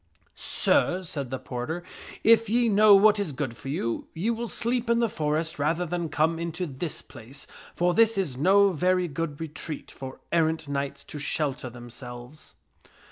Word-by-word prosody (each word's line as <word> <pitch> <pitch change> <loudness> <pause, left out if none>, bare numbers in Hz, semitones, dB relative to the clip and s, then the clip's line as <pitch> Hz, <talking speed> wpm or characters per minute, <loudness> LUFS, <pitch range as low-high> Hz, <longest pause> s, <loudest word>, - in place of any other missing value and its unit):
" - - -46
Sir," 185 +1 +1
said 140 -6 -3
the 130 - -3
porter, 130 +8 -5 0.2
" - - -14
if 230 -1 +1
ye 235 +1 +3
know 210 0 +7
what 210 +1 +5
is 200 -7 -1
good 130 -3 -3
for 135 - -8
you, 115 -5 -2
ye 195 +8 0
will 235 +1 -3
sleep 235 +1 -1
in 235 - +4
the 235 0 +3
forest 155 -3 -2
rather 165 +5 +1
than 170 -1 -3
come 160 +2 +1
into 170 +2 -3
this 150 +1 -5
place, 135 +6 -11 0.3
for 175 0 +2
this 225 +1 +4
is 175 -10 -1
no 195 +8 +5
very 180 +2 +1
good 150 -1 -4
retreat 155 -1 -6
for 130 -1 -9
errant 160 -2 +1
knights 140 -1 -3
to 150 - -8
shelter 140 -3 -1
themselves." 120 +3 -10
160 Hz, 180 wpm, -26 LUFS, 140-190 Hz, 0.3 s, know